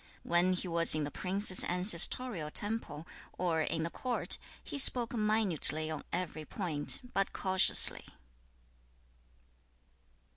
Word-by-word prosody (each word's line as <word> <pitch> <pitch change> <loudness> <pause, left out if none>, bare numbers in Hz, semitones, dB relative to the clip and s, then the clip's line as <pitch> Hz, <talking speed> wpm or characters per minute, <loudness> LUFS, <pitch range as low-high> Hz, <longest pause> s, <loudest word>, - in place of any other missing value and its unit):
2. - - -16
When 175 +2 +1
he 185 0 -5
was 170 -2 +5
in 155 - -3
the 145 - -7
prince's 190 +2 +2
ancestorial 180 +1 +2
temple, 205 -5 -4 0.3
or 170 -3 -3
in 160 +1 -4
the 165 - -6
court, 255 -1 -5 0.2
he 285 - -6
spoke 245 -3 +4
minutely 210 -8 -1
on 155 - -8
every 170 -3 -6
point, 155 - -5
but 195 0 -3
cautiously. 190 -1 +4
180 Hz, 120 wpm, -29 LUFS, 160-205 Hz, 0.3 s, was